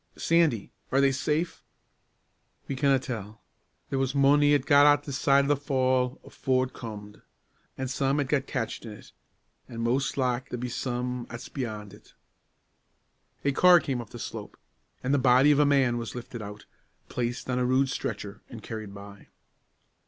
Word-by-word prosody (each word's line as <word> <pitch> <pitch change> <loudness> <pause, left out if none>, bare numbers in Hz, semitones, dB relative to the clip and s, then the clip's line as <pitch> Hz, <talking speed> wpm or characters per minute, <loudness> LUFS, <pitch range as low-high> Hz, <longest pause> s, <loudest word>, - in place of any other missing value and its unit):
"Sandy 165 -10 +2 0.2
are 135 - +3
they 140 0 +4
safe?" 150 +5 -2 1.0
"We 135 - -3
canna 135 0 +3
tell. 110 -5 -7 0.5
There 135 - 0
was 135 +1 -1
mony 145 +1 +5
'at 140 -2 0
got 145 +1 +6
this 140 -2 -4
side 140 0 +4
o' - - -2
the 145 - +4
fall 130 -1 0
afoor 130 -1 0
it 130 - -12
comed; 105 -3 -9 0.6
an' 130 - -3
some 135 +2 0
'at 140 - 0
got 135 -1 0
catched 115 -4 -3
in 110 -2 -8
it; 105 - -14 0.6
an' 115 -1 -6
mos' 125 +5 0
like 125 -1 0
there 125 - -4
be 125 +1 -4
some 125 0 -3
'at's 120 0 -8
beyon' 110 -6 -5
it." 105 - -18 1.3
A 140 - +3
car 180 +5 +6
came 135 -6 -3
up 115 - -11
the 120 - -9
slope, - - -7 0.5
and 130 +2 0
the 145 - +3
body 130 +3 +5
of 145 - +3
a 145 - +5
man 130 -4 +3
was 115 -2 -6
lifted 120 -1 -7
out, 105 0 -9 0.4
placed 120 0 -3
on 125 -1 0
a - - +1
rude 130 +2 +3
stretcher, 105 -5 -5
and 115 -2 -10
carried 110 -3 -7
by. 100 0 -12
130 Hz, 175 wpm, -27 LUFS, 120-140 Hz, 1.3 s, got